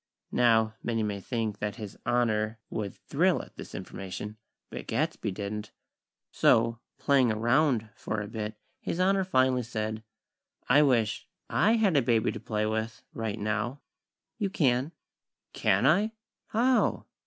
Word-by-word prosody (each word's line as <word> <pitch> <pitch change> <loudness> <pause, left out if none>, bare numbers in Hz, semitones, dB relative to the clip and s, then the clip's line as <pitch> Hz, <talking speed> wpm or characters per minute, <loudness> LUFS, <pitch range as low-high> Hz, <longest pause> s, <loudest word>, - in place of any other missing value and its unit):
Now, 110 -2 +4
many 115 -2 -1
may 100 -2 -2
think 110 -2 -2
that 105 -1 -2
His 105 -3 -7
Honor 115 -2 +1
would 100 -3 -3
thrill - - +1
at - - -16
this - - -9
information; 100 +3 -6 0.3
but - - -7
Gadsby - - -1
didn't. 105 +2 -5 0.6
So, 115 +1 +3 0.2
"playing 135 -4 +3
around" 120 +1 +2
for 110 - -3
a 105 - -4
bit, 110 0 -4 0.2
His 170 - -3
Honor 190 +1 +3
finally 130 -7 +2
said: 110 -2 -3 0.7
"I 140 +4 +6
wish 120 -7 +2 0.2
I 215 +5 +4
had 215 -7 +3
a 140 - +5
baby 115 -2 +2
to - - -6
play 105 -1 -1
with, 110 +1 -2
right 110 -2 -3
now!" 110 +5 -2 0.6
"You 200 -3 0
can." 135 -4 +1 0.6
"Can - - +2
I? 200 +10 +4 0.3
How?" 245 +3 +2
115 Hz, 145 wpm, -29 LUFS, 110-135 Hz, 0.7 s, I